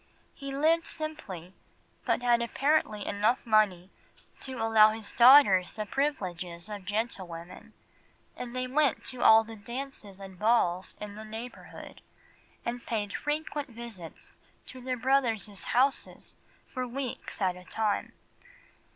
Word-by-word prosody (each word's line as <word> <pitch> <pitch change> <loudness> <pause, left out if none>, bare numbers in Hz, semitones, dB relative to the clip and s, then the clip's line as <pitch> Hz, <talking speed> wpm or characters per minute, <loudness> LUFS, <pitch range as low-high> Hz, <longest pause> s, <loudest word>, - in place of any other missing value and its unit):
He 275 -1 -7
lived 320 +4 +2
simply, 215 - -4 0.5
but - - +1
had 240 -1 +3
apparently 235 -4 +1
enough 215 +6 +1
money 205 -5 +2 0.5
to 260 -3 -6
allow 225 -1 +6
his 215 -1 -5
daughters 235 -8 +7
the 215 - -4
privileges 185 - -3
of 205 -3 -7
gentlewomen, 185 -5 -5 0.6
and 245 0 -7
they 255 0 -1
went 280 +2 +1
to 255 -2 -4
all 220 0 +7
the 225 0 -10
dances 225 -3 -6
and 190 -2 -11
balls 200 -5 +1
in 210 -1 -7
the 215 +1 -9
neighbourhood, 225 +3 -9 0.6
and 235 0 -3
paid 210 -3 -2
frequent 295 -1 -3
visits 225 -8 -9 0.3
to 255 - -9
their 255 0 -2
brothers' 235 -6 +1
houses 265 +3 0 0.3
for 255 -1 -4
weeks 255 0 -5
at 185 -3 +1
a 180 - -12
time. 210 +2 -2
225 Hz, 130 wpm, -29 LUFS, 200-255 Hz, 0.6 s, daughters